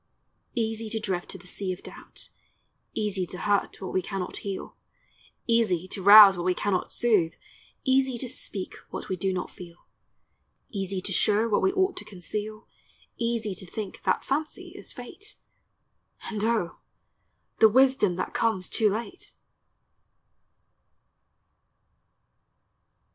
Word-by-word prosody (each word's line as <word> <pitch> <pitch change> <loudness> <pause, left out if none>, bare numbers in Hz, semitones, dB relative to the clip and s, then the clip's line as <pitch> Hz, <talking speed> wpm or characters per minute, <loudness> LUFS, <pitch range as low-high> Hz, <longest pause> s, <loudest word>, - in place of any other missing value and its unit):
Easy 225 -1 -1
to 220 0 -1
drift 190 -4 -3
to - - -5
the 180 - -17
sea 185 +1 -3
of 180 - -7
doubt, - - -9 0.6
Easy 205 -3 -1
to 180 - -7
hurt 205 +2 0
what 190 - -6
we 185 - +2
cannot 190 0 -4
heal, 195 -2 -5 0.7
Easy 215 -7 +2
to 195 - -4
rouse 200 0 +10
what 175 - -3
we 180 0 +2
cannot 195 -3 -1
soothe, 205 -9 +2 0.5
Easy 265 -1 +2
to 255 - -3
speak 200 -4 -5
what - - -6
we 190 - 0
do 190 +2 0
not 180 -1 -3
feel, 175 -1 -12 0.9
Easy 195 -2 -2
to 195 - -3
show 210 +5 +3
what 210 - +2
we 380 - +3
ought 380 0 +2
to - - -4
conceal, 210 +3 -6 0.5
Easy 230 -3 -1
to 190 +1 -6
think 205 +1 -6
that - - +1
fancy 300 +3 -2
is - - -8
fate, 395 - -8 1.0
And 210 -1 -2
O, 220 -7 0 0.8
the 220 - +8
wisdom 255 -6 +4
that 185 - -3
comes 215 -5 0
too 220 -3 +3
late! 230 - -5
210 Hz, 135 wpm, -27 LUFS, 185-230 Hz, 1.0 s, rouse